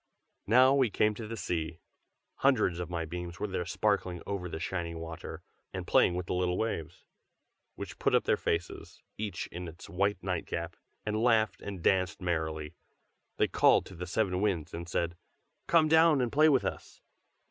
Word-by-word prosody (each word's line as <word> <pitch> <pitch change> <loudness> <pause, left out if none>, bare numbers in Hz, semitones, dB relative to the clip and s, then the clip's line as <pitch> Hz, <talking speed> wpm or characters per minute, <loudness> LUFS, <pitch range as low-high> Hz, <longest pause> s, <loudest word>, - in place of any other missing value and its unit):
Now 130 +5 +6
we 135 -4 +3
came 105 +1 +2
to 110 +1 -7
the 115 +1 -5
sea. 80 -4 -3 0.6
Hundreds 110 -10 +2
of 90 - -4
my 85 -2 -2
beams 85 +2 -6
were - - -1
there 95 -3 -3
sparkling 90 -3 0
over 95 -3 -3
the 80 - -5
shining 85 -1 -3
water, 80 0 -7 0.3
and - - -4
playing 90 - +4
with 90 0 -3
the - - -2
little 90 0 0
waves, 90 -6 -3 0.7
which - - -8
put - - +3
up - - +3
their - - +3
faces, 85 0 -3 0.2
each 105 -2 -3
in 90 0 -6
its 85 +1 -11
white 100 +3 +1
nightcap, 85 -2 -3 0.3
and 110 0 -1
laughed 110 -5 +3
and 95 -4 -6
danced 95 -1 +2
merrily. 80 -4 -2 0.6
They - - +3
called - - +4
to 95 - -11
the 90 +1 -6
seven 90 0 0
Winds 85 -7 -1
and 85 +1 -6
said: 85 0 -1 0.5
"Come 165 -2 +5
down 160 -1 +5
and 125 -2 0
play 155 +2 +5
with 135 -4 +3
us!" - - -5
90 Hz, 180 wpm, -30 LUFS, 85-110 Hz, 0.7 s, Now